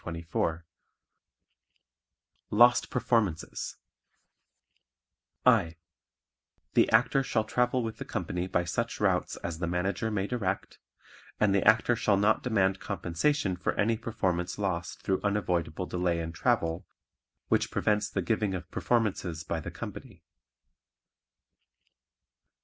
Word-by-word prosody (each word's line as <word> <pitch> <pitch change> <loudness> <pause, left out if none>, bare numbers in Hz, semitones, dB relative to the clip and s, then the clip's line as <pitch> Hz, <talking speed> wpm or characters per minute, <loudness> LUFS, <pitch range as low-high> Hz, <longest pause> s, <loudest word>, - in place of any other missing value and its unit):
Lost 120 +3 +5
Performances 115 -9 -1 1.7
(I) 100 -10 +4 1.0
The - - +4
Actor 135 - +4
shall 115 -4 0
travel 125 +3 +1
with 110 -1 -4
the - - -6
company 90 +1 -3
by 90 -1 +1
such 115 +7 -2
routes 95 -3 +1
as 85 -2 -4
the 85 - -1
Manager 95 +5 -1
may 100 -3 -1
direct, 100 -4 -3 0.6
and 105 -2 +3
the 100 - +2
Actor 110 +2 +5
shall 100 -3 +2
not 105 +2 +3
demand 95 -5 +1
compensation 100 - -1
for 90 - -1
any 115 +2 +1
performance 95 -6 -2
lost 90 -5 -3
through 95 - 0
unavoidable 90 -4 -1
delay 90 -2 -1
in 85 0 -4
travel 85 -3 0 0.6
which - - +2
prevents 105 -1 +1
the 95 - -2
giving 105 +1 0
of 90 -1 -7
performances 95 -8 0
by 80 - -3
the - - -6
company. - - -9
100 Hz, 115 wpm, -29 LUFS, 90-110 Hz, 1.7 s, Lost